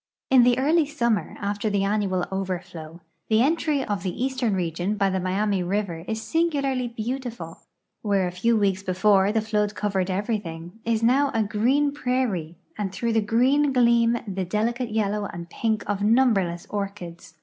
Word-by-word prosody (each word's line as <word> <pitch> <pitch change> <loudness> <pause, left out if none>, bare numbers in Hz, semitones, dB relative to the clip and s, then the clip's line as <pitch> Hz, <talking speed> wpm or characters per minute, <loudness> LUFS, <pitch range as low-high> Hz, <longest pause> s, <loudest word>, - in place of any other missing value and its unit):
In 260 -1 +7
the 245 0 +4
early 300 +4 +3
summer, 235 -8 -1
after 205 +1 -2
the 200 -1 0
annual 195 -3 0
overflow, 175 -4 -5 0.3
the 220 +1 +4
entry 300 -2 +1
of 205 -3 -2
the 190 +6 -3
eastern 255 -6 -1
region 180 +3 -2
hy 195 -1 +2
the 190 - 0
Miami 190 +2 0
river 180 -2 -2
is 220 0 -3
singularly 275 -2 0
beautiful. 235 -6 -5 0.4
Where 200 -3 +1
a 180 - -2
few 225 +6 +1
weeks 195 -2 +1
before 195 +1 +3
the 220 0 +1
flood 210 -1 -1
covered 195 -3 -1
everything, 190 -2 -4
is 230 -1 0
now 270 +4 +4
a 225 - +3
green 250 +8 +1
}>rairie, 245 - -1 0.2
and 200 -2 -2
tlirough 230 +4 -2
the 225 - +3
green 260 +7 +2
gleam 235 -2 +3
the 190 -1 -2
delicate 230 +6 -1
yellow 210 -1 -1
and 170 -2 -8
pink 220 -2 -1
of 205 0 -2
numberless 205 -6 +2
orchids. 195 -5 -6
210 Hz, 165 wpm, -24 LUFS, 190-235 Hz, 0.4 s, In